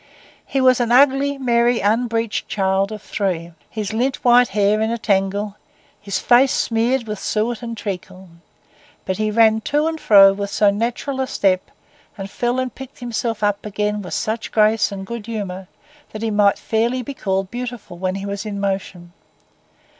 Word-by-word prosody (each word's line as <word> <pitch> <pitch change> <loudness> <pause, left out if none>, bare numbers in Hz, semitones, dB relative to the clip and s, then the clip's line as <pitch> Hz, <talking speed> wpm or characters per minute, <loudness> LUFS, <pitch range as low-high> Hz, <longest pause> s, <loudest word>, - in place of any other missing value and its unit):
He 270 - -1
was 255 -1 +4
an 240 -1 0
ugly, 275 +2 +4
merry, 240 -2 +2
unbreeched 225 +1 0
child 195 0 0
of 215 -1 -7
three, 175 -4 -3 0.2
his 215 -1 -4
lint 255 +4 0
white 245 0 +6
hair 205 +1 +1
in 220 - +1
a 235 - -1
tangle, 200 0 -1 0.4
his 200 -2 -2
face 250 +2 +4
smeared 235 +2 0
with 210 -2 -5
suet 220 +3 -1
and 230 -1 -6
treacle; 190 -2 -6 0.8
but 190 - -2
he 215 0 0
ran 220 0 +4
to 295 +5 0
and 320 0 -2
fro 195 -2 +7
with 200 0 -4
so 205 0 +3
natural 240 +6 -2
a 260 - -1
step, 185 -5 0 0.5
and 195 0 -7
fell 245 +1 -1
and 255 -2 -3
picked 265 +1 -11
himself 235 -2 -3
up 205 0 0
again 210 0 -2
with 180 - -5
such 220 +1 -3
grace 215 0 +3
and 195 -1 -6
good 235 +1 -7
humour, 195 -5 -5 0.5
that 215 +1 -6
he 225 - -1
might 205 -1 +3
fairly 235 +3 -1
be 280 - -6
called 195 -5 -2
beautiful 245 -6 -6
when 185 +1 -2
he 195 0 -5
was 200 0 -4
in 205 -2 -5
motion. 190 -3 -4
215 Hz, 175 wpm, -20 LUFS, 200-240 Hz, 0.8 s, fro